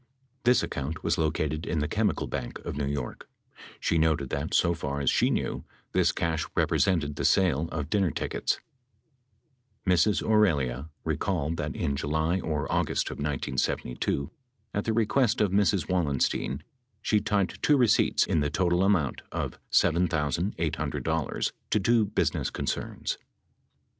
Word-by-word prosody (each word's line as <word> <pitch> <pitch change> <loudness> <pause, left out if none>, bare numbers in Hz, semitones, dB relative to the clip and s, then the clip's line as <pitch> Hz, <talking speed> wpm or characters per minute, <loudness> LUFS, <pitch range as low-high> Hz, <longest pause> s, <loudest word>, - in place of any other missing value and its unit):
This 125 +1 +5
account 75 +4 -4
was 90 - +1
located 80 -1 -1
in 85 - -1
the 75 0 0
Chemical - - 0
Bank - - -4
of - - -4
New 70 -1 -1
York. 70 -3 -4 0.5
She 85 - +1
noted 80 -4 +1
that, 70 +3 -2
so 85 -1 +3
far 70 -3 -3
as 70 -3 +2
she - - +3
knew, - - -1 0.3
this - - +3
cash 80 -1 -1
represented 80 -7 +2
the - - -2
sale 85 -4 +3
of 75 -3 -3
dinner 100 -4 +3
tickets. - - -2 1.3
Ms. 95 +2 +3
Aurelia 75 - +2
recalled 80 0 -1
that 75 0 -3
in 70 -5 -1
July 80 +5 0
or 80 -4 -2
August - - 0
of - - -7
1972, 70 -1 -1 0.4
at 100 - -1
the 115 - +1
request 115 +2 +2
of 105 -3 +2
Mrs. 100 -4 +2
Wallenstein, 75 -4 0 0.4
she 105 - +3
typed 100 -3 -1
two 150 - +4
receipts 125 -5 +4
in 80 - +1
the 75 0 +1
total 85 +2 +1
amount 95 -9 +1
of - - -4
$7,800 80 -1 0 0.2
to 105 - +2
two 115 +2 +3
business - - 0
concerns. - - -3
80 Hz, 145 wpm, -28 LUFS, 75-95 Hz, 1.3 s, This